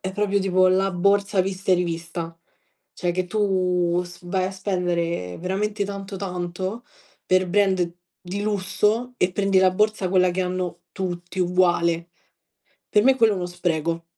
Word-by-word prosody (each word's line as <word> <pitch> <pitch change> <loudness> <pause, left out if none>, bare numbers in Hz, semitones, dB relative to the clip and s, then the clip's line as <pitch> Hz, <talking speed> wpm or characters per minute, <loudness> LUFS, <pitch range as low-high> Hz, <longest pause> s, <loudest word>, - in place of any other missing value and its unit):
è 190 0 -4
proprio 205 0 +1
tipo 185 -1 +3
la 190 +1 +2
borsa 200 +1 +2
vista 190 0 -3
e - - +7
rivista; 165 -1 -4 0.6
cioè 175 - -1
che 185 +1 -1
tu 180 -3 +1
s 175 -1 -12
vai 185 0 0
a 190 - -3
spendere 175 - -2
veramente 200 +3 -1
tanto 195 0 -6
tanto 185 +4 -4 0.4
per 185 0 +3
brand 185 -3 +1 0.3
di 195 +3 -3
lusso 210 +4 0
e 180 -3 +2
prendi 195 0 +1
la 185 -1 +5
borsa 210 -1 +1
quella 185 -1 +4
che 185 +2 -1
hanno 180 -1 -3
tutti 175 0 -5
uguale. 175 -2 +2 0.8
Per 210 - +4
me 265 +1 +5
quello 225 -4 +4
è - - -3
uno 180 -2 -2
spreco. 170 -2 -2
185 Hz, 155 wpm, -23 LUFS, 175-200 Hz, 0.8 s, e